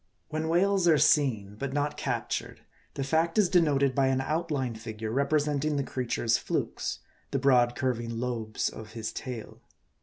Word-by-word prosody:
When 155 +1 -2
whales 190 +2 +3
are 160 -2 +6
seen, 110 -11 +2
but 140 -1 -3
not 145 +1 0
captured, 125 -5 -3 0.3
the 135 - -2
fact 160 +5 +1
is 205 -4 +4
de 175 - +5
noted 140 -4 +2
by 135 -1 +2
an 130 0 +2
outline 145 -3 -1
figure 110 -1 -6
representing 145 +2 +1
the 140 - +1
creature's 120 -3 0
flukes, - - -3 0.3
the - - -1
broad, 125 -3 +4
curving 120 -3 -2
lobes 115 -3 -2
of 110 0 -8
his 110 -1 -4
tail. 125 -4 -7
135 Hz, 160 wpm, -28 LUFS, 120-150 Hz, 0.3 s, are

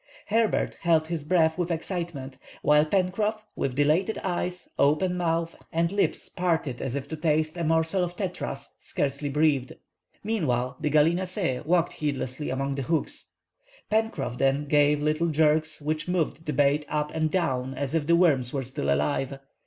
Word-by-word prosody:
Herbert 225 -1 +1
held 165 -2 +3
his 165 -4 -2
breath 160 +1 +2
with 175 -1 0
excitement, 165 -6 -4 0.2
while 150 +1 +5
Pencroff, 205 +4 0
with 130 -2 -2
dilated 155 +9 +2
eyes, 180 0 -2
open 155 +6 +3
month, 165 -1 0 0.2
and 165 +1 +1
lips 200 0 0
parted 165 -8 -1
as 135 -1 -3
if 140 -1 -4
to 160 - -3
taste 155 0 +1
a 170 - -3
morsel 165 +3 +2
of 175 0 -4
tetras, 180 -7 -5
scarcely 140 +1 -2
breathed. 140 -3 +1 0.5
Meanwhile 130 - 0
the 150 - 0
gallinaceæ 170 0 +1
walked 175 0 +2
heedlessly 145 -1 -3
among 135 +2 -1
the 135 - -3
hooks. 170 - -2 0.6
Pencroff 220 - 0
then 135 +2 +2
gave 145 0 +3
little 155 +2 +1
jerks, 155 0 +2
which 155 +1 -2
moved 165 -3 -1
the 150 - 0
bait 145 +2 +3
up 150 0 -1
and 160 -1 +1
down 135 -7 -1
as 140 +1 -3
if 155 -3 0
the 170 - +5
worms 140 -8 +3
were 135 -2 -2
still 120 - -2
alive. 75 - 0
155 Hz, 160 wpm, -26 LUFS, 140-175 Hz, 0.6 s, while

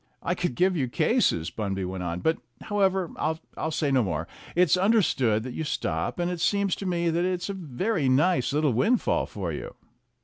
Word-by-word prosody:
"I 180 - +1
could 175 -7 -2
give 185 +4 +3
you 135 -6 0
cases," 120 - +1
Bunby 95 -2 -3
went 95 0 -4
on, 90 0 -3
"but, 160 - +1 0.2
however, 190 -4 +1 0.4
I'll 160 - -2
say 150 -2 0
no 130 -1 +4
more. 90 -8 -2 0.3
It's 175 -2 +5
understood 180 - +2
that 125 0 -6
you 160 - -3
stop, 85 - -2
and 175 0 0
it 175 -2 -4
seems 200 0 +2
to 195 - -4
me 170 -2 +1
that 170 +2 +1
it's 180 0 -1
a - - -1
very 175 - -1
nice 135 0 +3
little 150 -2 +2
windfall 220 - +2
for - - -4
you." - - -6
165 Hz, 195 wpm, -26 LUFS, 120-185 Hz, 0.4 s, It's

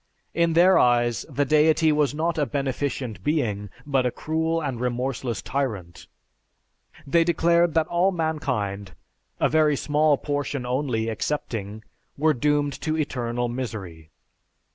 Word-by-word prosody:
In 170 -1 +2
their 180 +3 +6
eyes 120 -3 +2
the 145 - 0
Deity 155 +2 +4
was 150 -2 +2
not 160 +1 -1
a 145 - +1
Beneficent 135 -4 -3
Being, 110 -10 -1 0.2
but 135 -3 +1
a 125 - +1
cruel 160 +5 -1
and 135 -6 -3
remorseless 125 -3 -2
tyrant. 105 -11 -4 1.0
They 165 +4 +3
declared 170 0 +2
that 160 -1 +3
all 175 +4 +2
mankind, 125 - -2 0.4
a - - +3
very 155 -1 +3
small 150 +1 +2
portion 145 -2 -3
only 125 -3 -1
excepting, 110 -3 -3 0.3
were 155 +2 +3
doomed 145 +2 +1
to 155 0 -1
eternal 120 -5 -2
misery. 105 -10 -6
140 Hz, 130 wpm, -24 LUFS, 120-155 Hz, 1.0 s, their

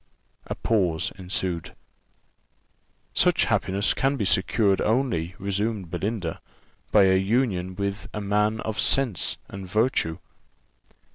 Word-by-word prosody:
A - - -3
pause 90 -8 0
ensued. 90 -3 -3 1.4
"Such - - +4
happiness 100 +2 +1
can 135 +1 +1
be 110 - -1
secured 95 +1 +2
only," 105 -8 0
resumed 100 -1 -2
Belinda, 95 -2 -3 0.5
"by 105 - +6
a 95 0 +5
union 95 -4 0
with 100 +1 -3
a 105 - -4
man 105 +2 +1
of 110 -1 -4
sense 130 -9 +2
and 95 -1 -8
virtue." 105 -5 +1
100 Hz, 115 wpm, -25 LUFS, 95-110 Hz, 1.4 s, by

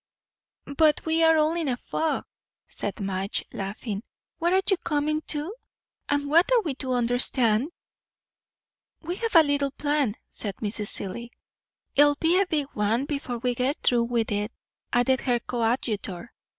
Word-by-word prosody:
"But 310 -2 +4
we 320 0 +2
are 325 0 +6
all 310 +1 +3
in 335 -3 -2
a 250 -2 0
fog," 320 +5 -2 0.4
said 205 +2 -4
Madge, 195 0 -2
laughing. 200 +1 -4 0.4
"What 345 +1 +1
are 380 +1 +4
you 390 - +4
coming 305 -2 -1
to? 305 +6 -2 0.6
and 285 0 +1
what 335 +10 +4
are 480 -3 +4
we 310 -6 -2
to 260 -2 -1
understand?" 245 0 +2 1.3
"We 350 +3 -4
have 460 -2 -3
a 325 - +9
little 285 -1 +1
plan," 290 -5 0
said 200 -4 -4
Mrs. 210 0 -2
Seelye. 235 +5 -1 0.7
"It'll 290 +1 +6
be 335 +5 +3
a 395 - 0
big 305 -5 0
one, 220 +5 +1
before 280 -4 -3
we 245 +1 -1
get 255 +5 0
through 235 -1 +3
with 235 -2 -1
it," 205 +2 -1 0.4
added 260 +2 +2
her 245 -2 +1
coadjutor. 230 -4 -2
265 Hz, 155 wpm, -26 LUFS, 230-310 Hz, 1.3 s, a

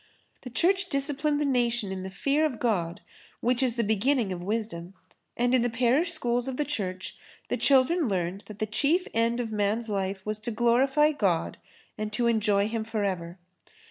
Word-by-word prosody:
The 250 - -8
Church 370 +8 +1
disciplined 290 0 0
the 295 - +1
nation 240 -6 +1
in 190 -1 -4
the 190 - -5
fear 275 +10 0
of 295 -7 0
God 190 -6 -1 0.4
which 245 +1 +1
is 250 -3 +1
the 235 - +1
beginning 220 +1 +1
of 180 -1 -4
wisdom 195 -3 -4 0.4
and 245 +1 +2
in 255 - +4
the 245 - +1
parish 255 +9 +2
schools 245 -6 -1
of 260 -1 -4
the 295 - 0
Church 195 -9 -4 0.3
the - - +1
children 280 +4 +3
learned 185 +1 -2
that 215 - -9
the 215 - -1
chief 295 - +1
end 230 +1 +1
of 230 -2 -3
man's 215 +2 0
life 195 -1 -2
was 215 0 -2
to 220 - -4
glorify 260 +6 +3
God 195 - 0 0.4
and 215 0 -3
to 235 +2 0
enjoy 210 -3 +2
Him 225 0 -2
for 220 -1 -2
ever. 175 -3 -3
230 Hz, 190 wpm, -27 LUFS, 200-265 Hz, 0.4 s, in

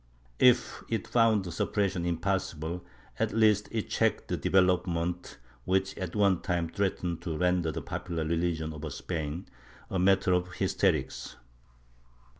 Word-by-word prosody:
If 125 -1 +4
it 115 -4 -2
found 115 -4 +3
suppression 90 -1 0
impossible, 85 -2 -2 0.4
at 110 0 0
least 105 -2 +4
it 110 -2 -2
checked - - 0
the - - 0
development 90 -2 +1 0.3
which 95 +3 0
at 95 -1 -5
one 100 -4 +3
time 85 -2 -1
threatened 90 -2 -2
to 85 -3 -3
render 90 -2 +1
the - - -5
popular 85 -3 -3
religion 80 -1 -1
of 75 0 -6
Spain 80 +3 -4 0.4
a 95 - 0
matter 95 0 +4
of 90 0 0
hysterics. 90 -7 0
90 Hz, 130 wpm, -29 LUFS, 85-95 Hz, 0.4 s, If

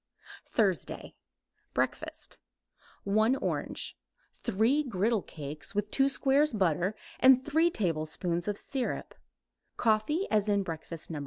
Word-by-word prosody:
THURSDAY 200 -6 0 0.6
BREAKFAST - - -2 0.6
1 215 +5 +3
orange; - - -3 0.4
3 230 +9 +2
griddle 220 -1 +1
cakes 155 +6 -8
with 210 0 -1
2 270 0 +3
squares 275 +1 +3
butter 185 0 +1 0.2
and 260 0 +6
3 320 +3 +3
tablespoons 170 - -1
syrup; 265 -3 -3 0.6
coffee 235 - +2
as 210 -1 +2
in 200 -1 +3
breakfast 165 -1 -5
(1). 155 - -3
210 Hz, 105 wpm, -30 LUFS, 180-265 Hz, 0.6 s, and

